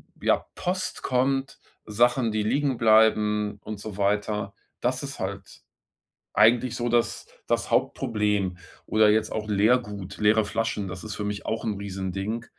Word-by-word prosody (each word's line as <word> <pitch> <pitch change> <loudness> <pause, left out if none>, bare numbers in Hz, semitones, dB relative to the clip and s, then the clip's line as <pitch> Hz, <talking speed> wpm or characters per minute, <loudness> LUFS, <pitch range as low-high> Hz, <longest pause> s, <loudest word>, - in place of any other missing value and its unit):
b - - -8
ja, - - +3
Post 185 +1 -3
kommt, 135 +1 0 0.3
Sachen, 120 +2 +2
die 110 0 0
liegen 135 +3 0
bleiben 105 -2 +3
und 110 -1 -6
so 105 -2 -7
weiter. 105 0 0 0.3
Das - - -1
ist - - -6
halt - - -6 0.7
eigentlich 115 +3 +4
so 120 0 -2
das 120 0 0 0.2
das - - 0
Hauptproblem, 105 -7 0 0.3
oder 110 -1 +4
jetzt 110 +1 +1
auch 110 -1 -3
Leergut, 105 -2 +1
leere 105 +1 +4
Flaschen. 105 -1 -2
Das 90 +2 -7
ist 110 - -5
für 105 - -4
mich 105 0 -4
auch 110 - -2
'n 105 -3 -1
Riesending, 100 +3 -4
110 Hz, 155 wpm, -26 LUFS, 105-120 Hz, 0.7 s, eigentlich